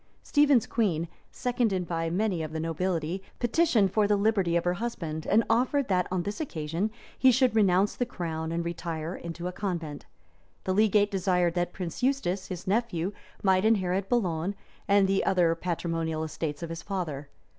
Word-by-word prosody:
Stephen's 290 -5 +4
queen, 175 -8 0 0.2
seconded 225 -8 0
by 165 -1 -1
many 185 0 0
of 155 -1 -4
the 160 - -2
nobility, 165 +2 -1 0.2
petitioned 240 - +3
for 210 -2 +3
the 205 - +3
liberty 200 -5 +2
of 170 - +2
her 175 - +1
husband; 165 -7 -4
and 220 +3 +4
offered, 255 +3 +2
that, 180 -2 +2
on 185 -2 0
this 205 +2 -4
condition, 170 - -2 0.3
he 260 - +7
should 255 -1 +3
renounce 195 -2 +3
the - - 0
crown, 160 -2 -4
and 170 0 -2
retire 170 -1 -4
into 170 +1 -7
a - - -3
convent. 170 -7 -4 0.6
The 185 - 0
legate 210 0 +3
desired 180 -3 +1
that 175 0 -1
Prince 180 +4 -6
Eustace, 200 -8 0
his 180 -2 -6
nephew, 195 -3 0 0.3
might 190 -1 +4
inherit 195 -3 +1
Boulogne 185 -5 0 0.3
and 200 -1 +5
the 195 0 +2
other 175 -3 +3
patrimonial 165 -2 -2
estates 155 0 -4
of 170 - -4
his 165 0 -5
father. 160 -8 -4
185 Hz, 170 wpm, -28 LUFS, 165-210 Hz, 0.6 s, he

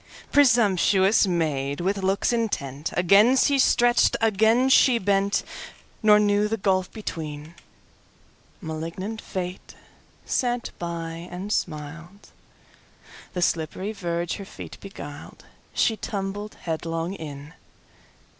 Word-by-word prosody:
Presumptuous 210 -6 +4
maid! 145 -5 -1
with 195 +3 -1
looks 195 +3 +1
intentAgain 200 - +2
she 280 +1 +3
stretch'd, 240 -2 +4
again 225 +3 +3
she 260 -2 +5
bent, 200 -1 +1 0.6
Nor 210 -1 +6
knew 205 0 +2
the 225 +1 -2
gulf 190 -2 0
between—Malignant 160 - -8
Fate 180 0 -6 0.5
sat 245 -1 -1
by 170 0 -5
and 190 +4 -4
smiled—The 165 +3 -8
slippery 170 +5 -1
verge 170 -4 -3
her 200 - -8
feet - - -10
beguiled; 145 -7 -10 0.3
She 225 - +2
tumbled 205 +1 -5
headlong 165 +1 -3
in! 150 -3 -8
190 Hz, 95 wpm, -24 LUFS, 165-210 Hz, 0.6 s, Nor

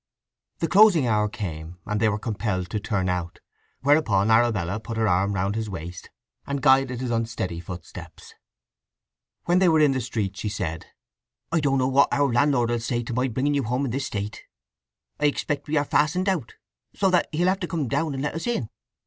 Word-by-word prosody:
The 165 - -1
closing 190 -7 +6
hour 105 -2 +1
came, 85 -5 -6
and 105 0 -1
they 110 0 +3
were 105 - -1
compelled 105 -5 -3
to 105 - -1
turn 100 -2 -1
out; 90 -2 -2 0.4
whereupon 115 -8 +3
Arabella 110 -5 +2
put 115 +1 -6
her 110 -1 +2
arm 100 +2 +1
round 95 +2 0
his 110 0 -3
waist, 90 -1 -7 0.4
and 140 0 -2
guided 130 -2 +4
his 125 -2 -2
unsteady 110 -7 -2
footsteps. 85 0 -10 1.1
When 175 +1 +3
they 185 -2 +5
were 160 -1 +4
in 150 -2 +5
the 130 -1 -1
streets 105 -5 -3
she 105 - -2
said: 85 -5 -4 0.6
"I 165 - +2
don't 140 -2 +1
know 130 -1 +2
what 135 +1 +4
our 140 -3 +2
landlord 120 -2 +2
will 120 - 0
say 120 +1 -2
to 120 - -5
my 125 +2 +1
bringing 130 +4 0
you 140 - +1
home 125 +3 -1
in 125 - -3
this 135 +3 -2
state. 105 +1 -5 0.8
I 150 - +3
expect 145 0 -2
we 155 +1 0
are 145 - +2
fastened 165 +7 +1
out, 170 -12 -1 0.4
so 195 -2 +2
that 180 - +3
he'll 170 +3 +1
have 190 +1 0
to 180 - -3
come 160 -6 -2
down 155 +4 -1
and 135 - -3
let 150 - -2
us 165 +8 -4
in." 180 - -1
120 Hz, 205 wpm, -24 LUFS, 105-145 Hz, 1.1 s, closing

